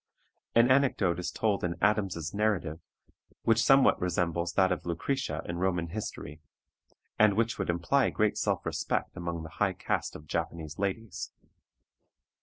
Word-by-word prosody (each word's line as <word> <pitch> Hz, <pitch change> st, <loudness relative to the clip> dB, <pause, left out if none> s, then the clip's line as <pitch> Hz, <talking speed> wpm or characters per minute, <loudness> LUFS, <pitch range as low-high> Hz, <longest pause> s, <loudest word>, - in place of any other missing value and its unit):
An 115 Hz, +2 st, +6 dB
anecdote 115 Hz, -10 st, +3 dB
is 90 Hz, -, -2 dB
told 105 Hz, -3 st, 0 dB
in 85 Hz, -1 st, -1 dB
Adams's 95 Hz, -6 st, 0 dB
narrative 100 Hz, -7 st, 0 dB, 0.6 s
which 115 Hz, 0 st, +3 dB
somewhat 135 Hz, 0 st, +5 dB
resembles 85 Hz, -1 st, 0 dB
that 95 Hz, 0 st, +3 dB
of 90 Hz, -, -1 dB
Lucretia 130 Hz, +11 st, -2 dB
in 85 Hz, 0 st, -4 dB
Roman 90 Hz, -2 st, 0 dB
history, 80 Hz, -6 st, -6 dB, 0.8 s
and 105 Hz, -2 st, +5 dB
which 115 Hz, +1 st, 0 dB
would 95 Hz, -, -2 dB
imply 85 Hz, +11 st, +2 dB
great 110 Hz, -1 st, +1 dB
self -, -, -1 dB
respect -, -, -2 dB
among 85 Hz, -1 st, -4 dB
the 80 Hz, -, -8 dB
high 100 Hz, -2 st, +3 dB
caste -, -, -2 dB
of 75 Hz, -, -10 dB
Japanese 80 Hz, 0 st, -4 dB
ladies. 100 Hz, +3 st, -3 dB
95 Hz, 145 wpm, -29 LUFS, 85-110 Hz, 0.8 s, An